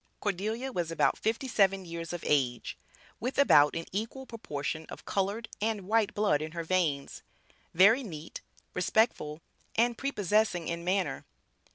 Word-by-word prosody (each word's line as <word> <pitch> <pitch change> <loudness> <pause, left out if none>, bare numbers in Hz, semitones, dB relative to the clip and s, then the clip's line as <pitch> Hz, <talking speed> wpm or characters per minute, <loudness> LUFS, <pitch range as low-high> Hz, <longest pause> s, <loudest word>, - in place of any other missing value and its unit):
Cordelia 215 +6 -2
was 175 -8 -2
about 165 - +2
fifty 225 +5 -1
seven 195 -5 +2
years 170 -1 -6
of 175 -1 -5
age, 130 -5 +1 0.4
with 250 +4 -3
about 150 - +6
an 165 0 -3
equal 225 +7 -4
proportion 155 - -5
of - - -10
colored 200 +4 -1
and 220 -1 0
white 220 -1 +2
blood 205 -8 +2
in 155 +1 -5
her 170 -1 -3
veins; 160 -5 0 0.5
very 210 +9 +6
neat, 165 - -8 0.3
respectful 180 -5 +1 0.3
and 235 +1 +3
prepossessing 210 - +1
in 170 0 -3
manner. 185 +1 0
190 Hz, 145 wpm, -30 LUFS, 165-225 Hz, 0.5 s, about